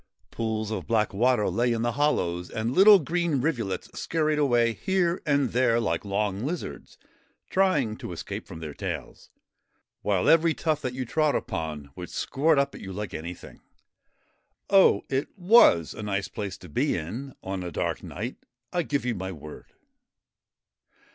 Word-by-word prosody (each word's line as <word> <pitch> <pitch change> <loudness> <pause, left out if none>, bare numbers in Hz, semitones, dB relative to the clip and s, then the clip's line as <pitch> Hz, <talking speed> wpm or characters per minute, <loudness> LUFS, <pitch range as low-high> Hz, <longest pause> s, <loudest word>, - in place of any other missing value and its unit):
Pools 110 -1 -2
of 110 - -4
black 110 -3 +1
water 120 +1 +2
lay 120 +6 +1
in 115 -1 0
the 120 - +1
hollows, 90 -11 0
and 110 +3 -2
little 200 +5 +8
green 170 -2 0
rivulets 120 -9 -2
scurried 155 -2 0
away 120 -5 +3
here 185 - 0
and 140 -4 +2
there 120 -1 +3
like 85 -7 -1
long 100 0 -1
lizards 170 +6 -5 0.5
trying 150 - +2
to - - -7
escape - - -6
from 80 - -9
their 75 -2 -6
tails, - - -6 0.7
while 100 -3 +1
every 165 0 +5
tuft 155 -2 -1
that 125 -1 -3
you 130 0 -3
trod 155 +3 +1
upon 75 -3 -4
would - - -7
squirt 155 +3 +1
up 140 0 +1
at - - -10
you 95 - -7
like 105 0 -5
anything. 85 +2 -8 1.1
Oh! 190 - +6
it 135 +8 -3
was 180 - +5
a - - -8
nice 100 -2 -2
place 100 -3 -5
to 90 - -12
be 125 - 0
in 120 - -6
on 95 0 -4
a 90 - -4
dark - - -2
night, 120 +5 -6 0.4
I 175 - +2
give 145 -5 -2
you 125 - 0
my 95 -2 -5
word. 75 -3 -10
120 Hz, 165 wpm, -26 LUFS, 95-150 Hz, 1.1 s, little